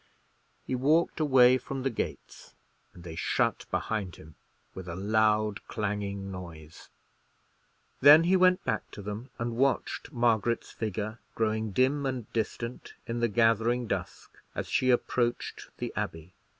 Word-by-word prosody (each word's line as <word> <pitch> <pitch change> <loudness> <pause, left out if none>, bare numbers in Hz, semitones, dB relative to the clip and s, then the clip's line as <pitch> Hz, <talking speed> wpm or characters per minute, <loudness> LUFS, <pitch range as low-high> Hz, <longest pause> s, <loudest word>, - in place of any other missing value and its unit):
He - - -4
walked 150 +7 +2
away 130 -4 +5
from 130 +1 -5
the 135 - 0
gates, 115 - -6 0.4
and 85 - -14
they 85 -2 -7
shut - - 0
behind 105 -5 -2
him 80 0 -14 0.4
with 95 -1 -8
a 85 - -5
loud 105 +1 +1
clanging 100 -2 -3
noise. 80 -4 -10 1.1
Then 145 +4 +9
he 180 +3 +3
went 185 0 +4
back 110 - -2
to 105 - -8
them, 105 +5 -6
and 115 0 -3
watched 135 +4 0
Margaret's 120 -3 +1
figure 110 +1 -4 0.2
growing 110 0 0
dim 135 +7 +1
and 125 -5 -5
distant 115 +1 -4
in 115 +1 -3
the 120 - +2
gathering 115 +2 +2
dusk - - -5 0.2
as - - -3
she 130 - +1
approached 120 -1 0
the - - -4
Abbey. 80 +2 -5
115 Hz, 140 wpm, -29 LUFS, 105-130 Hz, 1.1 s, Then